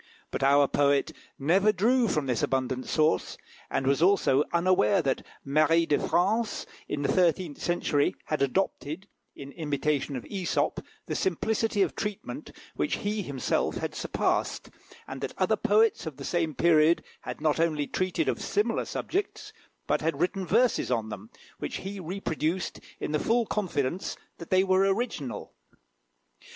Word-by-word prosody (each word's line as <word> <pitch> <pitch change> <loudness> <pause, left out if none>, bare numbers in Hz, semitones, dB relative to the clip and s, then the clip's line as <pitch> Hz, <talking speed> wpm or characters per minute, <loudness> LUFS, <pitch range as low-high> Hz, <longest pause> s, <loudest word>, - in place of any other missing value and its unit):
But - - -3
our 140 +1 +5
poet 140 0 +2 0.3
never 190 +9 +3
drew 230 +5 +3
from 150 -7 0
this 125 -4 0
abundant 130 -1 -1
source, 155 -12 +1 0.3
and 135 - -1
was 140 +3 +2
also 170 -7 +4
unaware 185 +3 +3
that 135 -5 0 0.2
Marie 155 +4 +3
de 145 -3 +2
France 215 +5 +1 0.2
in 145 -1 -2
the - - +1
thirteenth 175 -3 +1
century 160 -4 +1
had 155 - -2
adopted, 160 +3 -1 0.3
in 140 0 -9
imitation 145 -2 -1
of 125 - -4
Æsop, 190 -4 -1 0.2
the - - -4
simplicity 210 +3 +1
of - - -2
treatment 210 +8 -5 0.3
which - - 0
he 205 +1 -2
himself 140 -8 -1
had - - -3
surpassed, - - -1 0.4
and - - -7
that - - -4
other - - +2
poets 215 -4 +2
of 150 -4 -6
the 140 - -7
same 165 -4 -1
period 165 +1 +4 0.2
had - - -7
not 155 0 +1
only 155 -3 +1
treated 185 - -1
of - - -1
similar 415 - 0
subjects, 395 +2 -3 0.3
but - - +1
had 155 -2 -1
written 185 +2 -1
verses 235 +7 +2
on 115 -3 0
them, 105 +1 -8 0.3
which - - -4
he 195 +1 -6
reproduced 175 -1 -2 0.2
in - - -3
the 150 - +1
full 230 +6 +2
confidence 180 -5 -2 0.2
that 170 - -9
they 185 0 +4
were 185 -1 +3
original. 195 +6 -1
170 Hz, 155 wpm, -28 LUFS, 145-195 Hz, 0.4 s, our